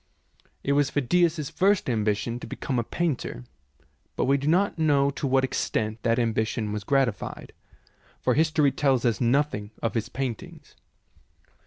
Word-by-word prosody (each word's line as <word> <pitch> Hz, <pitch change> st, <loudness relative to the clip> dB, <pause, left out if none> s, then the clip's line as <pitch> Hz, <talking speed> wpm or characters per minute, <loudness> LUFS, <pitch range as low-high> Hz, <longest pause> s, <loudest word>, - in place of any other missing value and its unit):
It 140 Hz, -, 0 dB
was 140 Hz, -1 st, +3 dB
Phidias's 155 Hz, +1 st, +1 dB
first 200 Hz, +1 st, +2 dB
ambition 110 Hz, 0 st, -1 dB
to -, -, -8 dB
become 130 Hz, -3 st, -3 dB
a -, -, 0 dB
painter, 135 Hz, -, -3 dB, 0.7 s
but -, -, 0 dB
we 135 Hz, +1 st, +3 dB
do 140 Hz, +1 st, -2 dB
not 180 Hz, +2 st, +2 dB
know 140 Hz, -3 st, +3 dB
to 140 Hz, -, -3 dB
what 135 Hz, 0 st, +3 dB
extent 110 Hz, -3 st, -2 dB
that 115 Hz, 0 st, +1 dB
ambition 110 Hz, -2 st, 0 dB
was 105 Hz, -1 st, -4 dB
gratified, 130 Hz, -2 st, -1 dB, 0.7 s
for -, -, +1 dB
history 155 Hz, -2 st, +3 dB
tells 135 Hz, -2 st, +1 dB
us 115 Hz, -5 st, +1 dB
nothing 120 Hz, -4 st, +1 dB
of 115 Hz, -, -2 dB
his 115 Hz, -3 st, -2 dB
paintings. 130 Hz, -4 st, -6 dB
130 Hz, 150 wpm, -26 LUFS, 115-145 Hz, 0.7 s, was